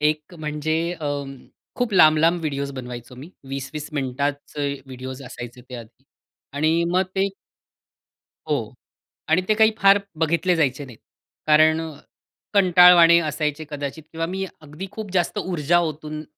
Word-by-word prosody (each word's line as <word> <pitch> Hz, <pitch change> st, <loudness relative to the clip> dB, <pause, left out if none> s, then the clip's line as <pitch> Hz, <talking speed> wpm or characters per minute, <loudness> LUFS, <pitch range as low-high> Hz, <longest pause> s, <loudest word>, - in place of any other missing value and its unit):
एक 150 Hz, +3 st, -1 dB
म्हणजे, 155 Hz, 0 st, -2 dB, 0.2 s
अं, 140 Hz, -2 st, -4 dB, 0.4 s
खूप 245 Hz, -4 st, -2 dB
लांब 155 Hz, -4 st, +6 dB
लांब 165 Hz, +2 st, +3 dB
व्हिडिओस 140 Hz, -3 st, -3 dB
बनवायचो 125 Hz, -1 st, -8 dB
मी. 140 Hz, +8 st, -11 dB, 0.2 s
20-20 140 Hz, +2 st, -5 dB
मिनिटाचे 140 Hz, +1 st, -2 dB
व्हिडिओज 130 Hz, +1 st, -8 dB
असायचे 125 Hz, -1 st, -9 dB
ते 125 Hz, -, -8 dB
आधी. 120 Hz, +3 st, -12 dB, 0.5 s
आणि 155 Hz, +4 st, +1 dB
मग 185 Hz, -, +3 dB
ते 195 Hz, +1 st, +2 dB, 1.2 s
हो -, -, +2 dB, 0.7 s
आणि 160 Hz, +3 st, +4 dB
ते 215 Hz, -, +4 dB
काही 220 Hz, +1 st, +4 dB
फार 195 Hz, +1 st, +6 dB, 0.2 s
बघितले 170 Hz, +3 st, +2 dB
जायचे 145 Hz, -3 st, 0 dB
नाहीत, 120 Hz, -4 st, -13 dB, 0.5 s
कारण 155 Hz, +1 st, +5 dB, 0.7 s
कंटाळवाणे 180 Hz, -3 st, +7 dB
असायचे 150 Hz, -1 st, -2 dB
कदाचित 145 Hz, +1 st, -5 dB
किंवा 165 Hz, 0 st, -2 dB
मी 190 Hz, +3 st, -3 dB, 0.2 s
अगदी 155 Hz, +6 st, -8 dB
खूप 210 Hz, -3 st, -7 dB
जास्त 180 Hz, +2 st, 0 dB
ऊर्जा 175 Hz, -3 st, +1 dB
ओतून 155 Hz, -1 st, -4 dB
155 Hz, 135 wpm, -22 LUFS, 140-170 Hz, 1.2 s, कंटाळवाणे